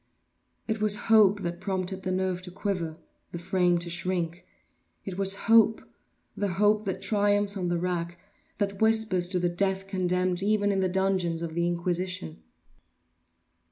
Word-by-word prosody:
It 220 -1 -2
was 210 -1 +3 0.2
hope 205 -2 +5
that 175 0 -4
prompted 190 0 -3
the 185 0 -3
nerve 185 -1 -1
to 180 - -7
quiver—the 170 -4 -5
frame 180 0 +1
to 170 0 -4
shrink. 175 -1 -3 0.6
It 190 - -5
was 195 0 +1
hope—the 220 -3 +1
hope 210 +3 +2
that 190 0 -3
triumphs 205 0 +2
on 185 -3 -2
the 175 0 0
rack—that 180 +3 -5
whispers 220 -5 +2
to 185 0 -2
the 180 0 +1
death 190 +2 -1
condemned 185 -1 0
even 205 0 +2
in 195 - 0
the 190 -1 +1
dungeons 185 -3 0
of 165 -1 -5
the 170 +1 0
Inquisition. 175 - -3
185 Hz, 145 wpm, -27 LUFS, 175-200 Hz, 0.6 s, hope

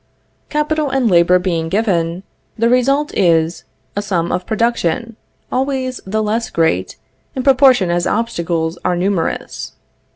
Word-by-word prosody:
Capital 300 0 0
and 265 -5 +1
labor 175 +1 +5
being 170 -3 -1
given, 185 -4 0 0.3
the 230 +1 +2
result 275 +4 +2
is, 165 -2 +2 0.3
a 205 - 0
sum 175 -4 -1
of 180 0 -2
production, 230 0 -1 0.4
always 260 -1 -2
the 215 +3 0
less 220 +2 -1
great, 95 - 0 0.4
in 260 - -2
proportion 255 -8 +4
as 175 0 0
obstacles 170 -7 -1
are 180 - +1
numerous. 180 -1 -2
205 Hz, 130 wpm, -17 LUFS, 170-250 Hz, 0.4 s, labor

